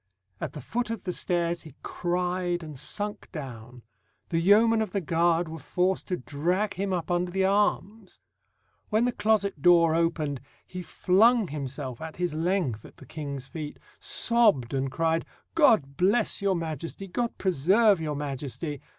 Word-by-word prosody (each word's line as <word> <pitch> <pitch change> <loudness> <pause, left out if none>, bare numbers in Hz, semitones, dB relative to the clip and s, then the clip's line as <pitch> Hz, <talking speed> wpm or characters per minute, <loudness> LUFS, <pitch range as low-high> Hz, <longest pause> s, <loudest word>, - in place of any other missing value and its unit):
At - - -4
the 150 - -7
foot 235 - -2
of 230 -4 -4
the 180 -3 -3
stairs 170 -1 0
he 155 -5 -12
cried 175 0 -1
and 155 -2 -8
sunk 205 +9 -4
down; 125 -6 -8 0.5
the 165 - +1
yeomen 220 +5 +5
of 220 - -3
the 200 - +1
guard 170 0 +1
were 160 0 -7
forced 180 +6 -1
to 180 - -1
drag 175 +10 -1
him 195 +1 -2
up 175 -2 -2
under 175 +1 +1
the 190 +1 +1
arms. 205 +1 0 0.7
When 220 +2 +2
the 245 - +1
closet 200 -8 +1
door 170 -1 +5
opened, 160 -5 0 0.2
he 180 - -7
flung 205 +4 +3
himself 135 -3 -5
at 160 0 -7
his 175 -3 -2
length 160 - -1
at - - -15
the 135 - -13
King's 140 -2 -6
feet, 155 -2 -7 0.2
sobbed, 215 - +3
and 135 0 -1
cried, 165 +2 +1 0.3
"God 160 - +4
bless 200 +5 +2
your 195 -1 +2
Majesty! 165 +3 -5
God 235 +5 -2
preserve 190 +3 +3
your 150 -2 -2
Majesty!" 145 +1 -4
175 Hz, 160 wpm, -27 LUFS, 150-195 Hz, 0.7 s, yeomen